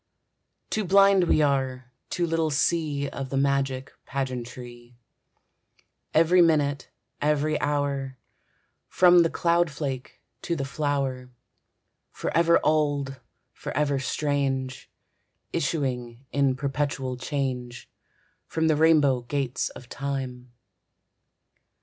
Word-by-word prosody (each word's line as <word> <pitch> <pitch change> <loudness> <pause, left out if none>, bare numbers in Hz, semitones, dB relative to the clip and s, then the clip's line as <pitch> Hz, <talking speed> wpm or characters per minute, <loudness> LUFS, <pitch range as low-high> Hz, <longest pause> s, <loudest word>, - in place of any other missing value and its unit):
Too 215 - 0
blind 195 0 +5
we 155 -2 +3
are, 130 -3 -1 0.2
too 175 - 0
little 165 -1 0
see 150 -1 0
Of 135 -1 -6
the 135 - -2
magic 135 -1 0
pageantry, 125 -2 -6 1.1
Every 165 +3 +5
minute, 145 -5 +2 0.3
every 150 +1 +1
hour, 140 -2 -1 0.7
From 180 -1 +6
the 165 - +3
cloudflake 150 -7 -1 0.2
to 170 - -2
the 140 -4 -3
flower, 135 -3 -2 0.8
Forever 170 0 +2
old, 145 -3 0 0.3
forever 145 -2 -1
strange, 135 -2 -2 0.6
Issuing 130 -5 -2
in 140 -2 +2
perpetual 135 -2 -2
change 125 -2 -4 0.6
From 160 0 0
the 155 - +4
rainbow 150 -5 +4
gates 130 0 -2
of 125 - -12
Time. 130 -2 -5
140 Hz, 95 wpm, -26 LUFS, 130-155 Hz, 1.1 s, From